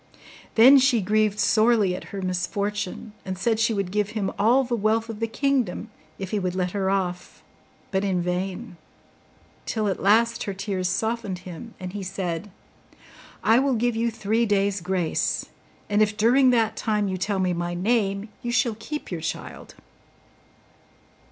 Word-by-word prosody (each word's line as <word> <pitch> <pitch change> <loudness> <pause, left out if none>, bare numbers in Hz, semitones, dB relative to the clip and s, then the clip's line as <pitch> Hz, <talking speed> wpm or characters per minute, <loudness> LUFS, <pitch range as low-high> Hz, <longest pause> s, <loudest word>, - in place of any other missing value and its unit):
Then 260 +5 +8
she 255 -3 +3
grieved 210 +1 +1
sorely 215 -2 +3
at - - -8
her 195 -1 -6
misfortune, 200 +3 -3
and 185 -1 -5
said 220 +3 +1
she 225 +1 +3
would 195 -3 -2
give 210 0 0
him 195 -2 -1
all 240 +6 +4
the 245 -1 -1
wealth 220 +1 +1
of 220 -2 -6
the 225 - 0
kingdom 260 -5 -1 0.3
if 190 -1 -6
he 210 - 0
would 185 -1 -2
let 180 -1 -1
her 195 -1 -1
off, 180 -2 -3 0.5
but 190 -1 0
in 190 -3 0
vain; 180 +3 -3 0.9
till 215 -2 -1
at 195 - -2
last 230 +4 +3
her 200 - -4
tears 190 -2 -2
softened 220 -1 -2
him, 185 +6 -9
and 185 -1 -6
he 205 - -4
said, 185 -1 -4 0.9
'I 225 +3 +5
will 270 -1 +2
give 240 +1 0
you 230 +1 +1
three 225 +1 0
days' 200 -1 +1
grace, 180 -2 -1 0.4
and 205 +1 +2
if 210 0 +2
during 250 +4 +5
that 225 -3 +2
time 210 -2 0
you 190 - -2
tell 200 +2 -1
me 185 -1 +1
my 175 0 -3
name, 200 +1 0
you 240 -2 -3
shall 240 -2 +1
keep 300 +3 -6
your 170 -3 -3
child. 165 - -6
205 Hz, 170 wpm, -24 LUFS, 185-225 Hz, 0.9 s, Then